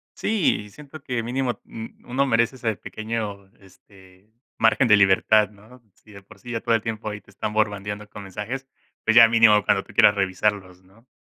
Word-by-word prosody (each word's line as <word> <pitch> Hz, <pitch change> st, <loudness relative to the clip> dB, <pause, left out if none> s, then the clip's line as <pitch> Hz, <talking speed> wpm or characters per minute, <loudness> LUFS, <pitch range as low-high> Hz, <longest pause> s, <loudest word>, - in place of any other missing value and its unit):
Sí, 175 Hz, -, 0 dB
siento 150 Hz, +4 st, -13 dB
que 125 Hz, -3 st, -3 dB
mínimo 125 Hz, +2 st, -1 dB
u 115 Hz, +1 st, -11 dB
uno 135 Hz, +2 st, +1 dB
merece 115 Hz, 0 st, +1 dB
ese 115 Hz, -4 st, -2 dB
pequeño, 105 Hz, -1 st, -6 dB
este, 95 Hz, +1 st, -21 dB, 0.3 s
margen 115 Hz, +3 st, +3 dB
de 105 Hz, -2 st, +6 dB
libertad, 100 Hz, +2 st, +4 dB
¿no? 105 Hz, +5 st, -18 dB
Si 110 Hz, -, -21 dB
de 100 Hz, -1 st, -13 dB
por -, -, -18 dB
sí 120 Hz, -, -10 dB
ya 115 Hz, -1 st, -3 dB
todo 120 Hz, -1 st, 0 dB
el 115 Hz, -, -1 dB
tiempo 110 Hz, 0 st, -5 dB
ahí 105 Hz, 0 st, -7 dB
te -, -, -25 dB
están 105 Hz, +2 st, -5 dB
bombardeando 105 Hz, -1 st, -2 dB
con 105 Hz, -, -10 dB
mensajes, 105 Hz, +8 st, -6 dB, 0.4 s
pues, 110 Hz, -, +2 dB
ya 115 Hz, -1 st, +9 dB
mínimo 110 Hz, -2 st, +5 dB
cuando -, -, +1 dB
tú -, -, -17 dB
quieras 105 Hz, -, +5 dB
revisarlos, 95 Hz, -1 st, -2 dB
¿no? 100 Hz, +6 st, -24 dB
110 Hz, 195 wpm, -23 LUFS, 100-115 Hz, 0.4 s, ya